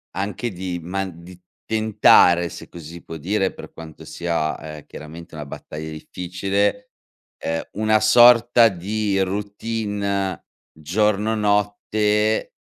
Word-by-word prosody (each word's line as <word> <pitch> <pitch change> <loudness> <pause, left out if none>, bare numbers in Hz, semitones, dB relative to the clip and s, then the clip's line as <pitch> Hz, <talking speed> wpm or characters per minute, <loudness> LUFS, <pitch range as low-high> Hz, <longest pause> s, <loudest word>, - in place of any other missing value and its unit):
anche 105 +5 -3
di 90 -1 -5
man 90 0 -5
di 90 +1 -13 0.3
tentare, 105 -5 +4
se - - -10
così 85 -3 -11
si 85 - -11
può 80 - -8
dire, 95 +5 -1
per - - -12
quanto 80 -2 -11
sia, 85 -2 -2
ehm, 75 -1 -9
chiaramente 80 +2 -11
una 75 -1 -6
battaglia 75 +2 -8
difficile, 95 +5 -2 0.5
ehm, 80 0 -1
una 110 +1 +2
sorta 120 +1 +6
di 100 +2 -2
routine 100 0 -2 0.3
giorno 105 +7 0
notte, 105 +1 +1
100 Hz, 120 wpm, -22 LUFS, 85-105 Hz, 0.5 s, sorta